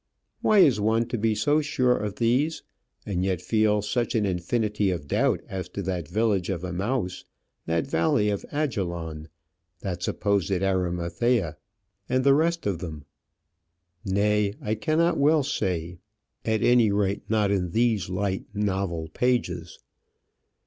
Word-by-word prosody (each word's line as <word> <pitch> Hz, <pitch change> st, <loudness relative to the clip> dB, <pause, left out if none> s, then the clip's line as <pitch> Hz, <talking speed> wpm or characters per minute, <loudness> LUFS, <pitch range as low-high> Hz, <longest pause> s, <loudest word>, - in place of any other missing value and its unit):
Why 215 Hz, -, +3 dB
is 140 Hz, -, +6 dB
one 110 Hz, +2 st, +1 dB
to 120 Hz, -, -1 dB
be 110 Hz, 0 st, +1 dB
so 150 Hz, +6 st, +2 dB
sure 125 Hz, -4 st, +2 dB
of 105 Hz, -3 st, -3 dB
these, 130 Hz, +8 st, +1 dB, 0.4 s
and 90 Hz, -3 st, -1 dB
yet 95 Hz, -2 st, 0 dB
feel 105 Hz, +1 st, +1 dB
such 120 Hz, +3 st, -1 dB
an 110 Hz, -2 st, +2 dB
infinity 100 Hz, +3 st, 0 dB
of 85 Hz, -6 st, -3 dB
doubt -, -, +1 dB
as 95 Hz, -2 st, -5 dB
to 100 Hz, -, -1 dB
that 90 Hz, -4 st, -3 dB
village 105 Hz, -3 st, 0 dB
of 90 Hz, -2 st, -3 dB
Emmaus, 95 Hz, +2 st, -2 dB, 0.4 s
that 80 Hz, 0 st, 0 dB
valley 135 Hz, -6 st, +2 dB
of 100 Hz, -, -3 dB
Ajalon, 85 Hz, -, -3 dB, 0.5 s
that 90 Hz, -3 st, -4 dB
supposed 100 Hz, 0 st, 0 dB
Arimathea, 90 Hz, +1 st, 0 dB, 0.5 s
and 130 Hz, +1 st, +2 dB
the 140 Hz, 0 st, +6 dB
rest 165 Hz, +3 st, +1 dB
of 100 Hz, -5 st, -1 dB
them? 80 Hz, -5 st, -7 dB, 1.0 s
Nay, 105 Hz, +1 st, +1 dB
I 105 Hz, -, -2 dB
cannot 155 Hz, +10 st, +1 dB
well 150 Hz, +1 st, +4 dB
say, 90 Hz, -, -2 dB, 0.5 s
at 110 Hz, -1 st, +1 dB
any 120 Hz, -3 st, +5 dB
rate 100 Hz, 0 st, -1 dB
not 105 Hz, -2 st, +2 dB
in 90 Hz, -3 st, 0 dB
these 110 Hz, 0 st, +1 dB
light 95 Hz, +1 st, -2 dB
novel 95 Hz, -5 st, -1 dB
pages. 90 Hz, -7 st, -1 dB
105 Hz, 140 wpm, -26 LUFS, 90-120 Hz, 1.0 s, is